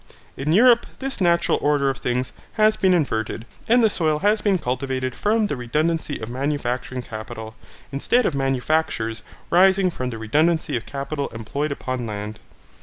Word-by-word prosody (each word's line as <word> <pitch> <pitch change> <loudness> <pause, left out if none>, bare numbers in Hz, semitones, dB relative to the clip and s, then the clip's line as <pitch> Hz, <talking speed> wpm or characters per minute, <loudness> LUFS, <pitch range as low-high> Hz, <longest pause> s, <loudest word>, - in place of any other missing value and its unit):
In 145 +3 -2
Europe, 235 +6 +5
this 270 -5 -4
natural 170 -2 +3
order 145 -2 +2
of 135 - -7
things 125 +1 -2 0.2
has 215 0 +4
been 190 -3 +2
inverted, 115 -9 0 0.2
and 240 +1 +5
the - - +7
soil 155 -5 +1
has 210 +5 +2
been 200 -3 +2
cultivated 130 -2 -2
from 215 - +1
the 205 - -2
redundancy 150 +5 -1
of 110 - -6
manufacturing 130 -1 -2
capital, 110 0 -7 0.4
instead 235 - +2
of - - +1
manufactures 135 -3 0 0.3
rising 190 +1 +5
from 130 -5 -4
the 115 - -6
redundancy 150 +6 +1
of 115 - -4
capital 140 +1 -3
employed 140 +7 -4
upon 130 -3 -3
land. 105 0 -5
140 Hz, 160 wpm, -23 LUFS, 125-175 Hz, 0.4 s, the